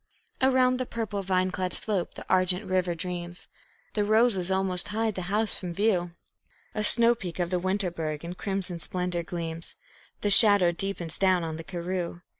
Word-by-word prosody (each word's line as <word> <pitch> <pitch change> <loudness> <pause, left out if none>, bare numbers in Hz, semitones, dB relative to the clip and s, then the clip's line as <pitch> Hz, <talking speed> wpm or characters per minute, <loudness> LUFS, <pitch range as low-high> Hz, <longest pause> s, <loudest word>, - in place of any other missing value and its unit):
Around 255 -1 +3
the 255 - -2
purple, 215 -3 -3
vine 185 -1 0
clad 185 0 -3
slope 200 -5 -2
the - - -9
argent 185 +2 +3
river 185 -2 0
dreams; 175 0 -6 0.5
The 210 - +1
roses 215 -3 +2
almost 190 -1 +2
hide 220 +1 -1
the 185 - -5
house 215 +2 0
from 175 -2 -6
view; 180 -4 0 0.6
A 215 - -2
snow 235 +2 +6
peak 185 -8 -7
of 175 -1 -2
the 180 - +1
Winterberg 175 -5 -2
in 170 - -5
crimson 190 -2 -4
splendor 180 +1 -2
gleams; 165 -1 -4 0.5
The 205 - +1
shadow 200 -4 +6
deepens 175 -2 -2
down 185 -2 +3
on 160 -1 -4
the 165 - -7
karroo. 175 0 -4
185 Hz, 170 wpm, -27 LUFS, 175-205 Hz, 0.6 s, snow